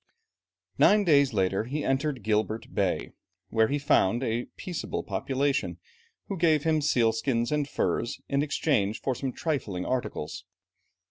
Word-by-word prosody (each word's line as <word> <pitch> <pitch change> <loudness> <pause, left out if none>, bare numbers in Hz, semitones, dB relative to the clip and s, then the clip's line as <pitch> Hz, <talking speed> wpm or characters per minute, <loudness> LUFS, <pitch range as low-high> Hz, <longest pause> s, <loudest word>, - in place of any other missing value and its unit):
Nine 210 0 +6
days 140 -6 +4
later 95 0 0
he 145 +5 -3
entered 135 -2 0
Gilbert 110 +1 -1
Bay, - - 0 0.4
where 110 -1 +3
he 145 - 0
found 120 -4 +2
a 120 0 -1
peaceable 175 -3 -4
population, 110 -2 -1 0.5
who 195 - -4
gave 155 -3 +3
him 155 -1 +2
sealskins 115 -2 +1
and 150 -1 0
furs 120 - -1
in 140 0 +1
exchange 115 -8 0
for 135 - -1
some 130 +1 -3
trifling 115 - -3
articles. 95 -10 -3
130 Hz, 135 wpm, -27 LUFS, 110-145 Hz, 0.5 s, Nine